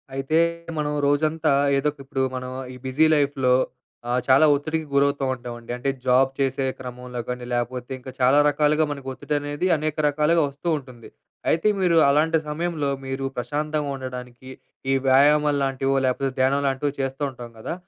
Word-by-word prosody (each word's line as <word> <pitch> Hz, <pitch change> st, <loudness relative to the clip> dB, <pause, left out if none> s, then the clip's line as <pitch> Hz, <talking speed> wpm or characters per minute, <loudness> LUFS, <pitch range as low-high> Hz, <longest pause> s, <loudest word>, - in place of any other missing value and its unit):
అయితే 135 Hz, +4 st, 0 dB, 0.4 s
మనం 150 Hz, -1 st, -1 dB
రోజంతా 155 Hz, +1 st, +1 dB, 0.3 s
ఏదో 135 Hz, -, 0 dB
ఒక 145 Hz, -, -24 dB
ఇప్పుడు, 135 Hz, 0 st, -3 dB
మనం 130 Hz, 0 st, -5 dB, 0.2 s
ఈ -, -, -10 dB
బిజీ 130 Hz, +5 st, +3 dB
లైఫ్‌లో 140 Hz, -3 st, +2 dB, 0.6 s
ఆహ్, 125 Hz, +1 st, +2 dB
చాలా 135 Hz, +3 st, +6 dB
ఒత్తిడికి 155 Hz, +2 st, -2 dB
గురవుతూ 140 Hz, 0 st, +2 dB
ఉంటామండి. 120 Hz, -1 st, -8 dB
అంటే 125 Hz, +3 st, -2 dB, 0.2 s
జాబ్ 130 Hz, +1 st, +4 dB
చేసే 135 Hz, 0 st, 0 dB
క్రమంలో 125 Hz, -1 st, -7 dB
గానీ, 125 Hz, 0 st, -4 dB
లేపోతే 120 Hz, +1 st, -3 dB
ఇంకా 130 Hz, +1 st, -9 dB
చాలా 130 Hz, +2 st, +4 dB
రకాలుగా 150 Hz, +1 st, +2 dB
మనకు 140 Hz, -2 st, -7 dB
ఒత్తిడనేది 145 Hz, +4 st, -2 dB
అనేక 155 Hz, 0 st, -2 dB
రకాలుగా 150 Hz, +3 st, +2 dB
ఒస్తూ 140 Hz, +5 st, -9 dB
ఉంటుంది. 125 Hz, -5 st, -12 dB, 0.4 s
అయితే 165 Hz, +6 st, +2 dB
మీరు 175 Hz, -3 st, +3 dB
అలాంటి 155 Hz, +3 st, +3 dB
సమయంలో 155 Hz, -2 st, -2 dB, 0.2 s
మీరు 135 Hz, 0 st, -3 dB
ప్రశాంతంగా 150 Hz, +4 st, -2 dB
ఉండడానికి 125 Hz, -1 st, -8 dB, 0.4 s
ఈ -, -, +3 dB
వ్యాయామాలు 145 Hz, +2 st, +4 dB
లాంటివో, 135 Hz, 0 st, 0 dB
లేపోతే 135 Hz, +1 st, 0 dB
ధ్యానం 135 Hz, +2 st, +3 dB
లాంటివో 135 Hz, +2 st, 0 dB
చేస్తూ 135 Hz, +1 st, -4 dB
ఉంటాం 120 Hz, -2 st, -10 dB
గదా! 110 Hz, -, -4 dB
135 Hz, 155 wpm, -23 LUFS, 130-150 Hz, 0.6 s, చాలా